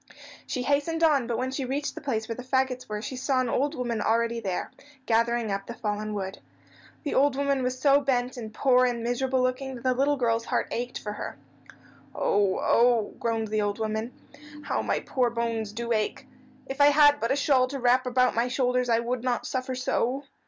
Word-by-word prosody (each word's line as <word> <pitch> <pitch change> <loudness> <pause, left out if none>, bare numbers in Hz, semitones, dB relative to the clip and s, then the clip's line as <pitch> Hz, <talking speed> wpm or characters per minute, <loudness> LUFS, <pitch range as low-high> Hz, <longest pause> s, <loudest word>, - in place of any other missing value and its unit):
She 250 - -2
hastened 290 +5 0
on, 285 -7 +4
but 235 -2 -1
when 255 +2 -2
she 270 +1 -3
reached 275 +3 -2
the 320 - -8
place 225 -6 -2
where 230 - -4
the 250 - -7
fagots 260 -1 -1
were 210 0 -4
she 260 - -5
saw 260 +1 0
an 255 -2 0
old 285 +6 0
woman 240 -4 -2
already 230 +2 +1
there, 190 -5 -3 0.3
gathering 230 -1 +1
up 195 0 -3
the 235 - -6
fallen 210 -2 -3
wood. 190 -1 -4 0.6
The 295 - -2
old 280 0 +3
woman 280 -1 0
was 255 0 -1
so 280 +1 +4
bent 255 -2 0
and 225 -3 -7
poor 255 +2 +3
and 235 -2 -2
miserable 255 +2 0
looking 255 +1 -2
that 240 - -10
the 255 -1 +2
little 280 +3 +1
girl's 230 -2 0
heart - - -1
ached 245 +1 -3
for 210 - -5
her. - - -6 0.8
"Oh, 200 -2 +2
oh!" 235 -3 +3
groaned 225 -2 -1
the 215 0 0
old 205 0 -1
woman. 220 +1 -2 0.5
"How - - -1
my - - -1
poor 250 -2 0
bones 230 -2 -2
do 235 +2 -4
ache. 215 +4 -2 0.4
If 270 +2 -3
I 285 - +8
had 290 0 +6
but 230 - -1
a - - +3
shawl 275 -3 +3
to 275 +2 -5
wrap 250 0 +2
about 250 0 +3
my 235 +2 +1
shoulders 250 -1 0
I 230 - +4
would 235 +1 -2
not 250 -2 -1
suffer 255 0 -3
so." 255 +1 -1
250 Hz, 210 wpm, -27 LUFS, 230-265 Hz, 0.8 s, I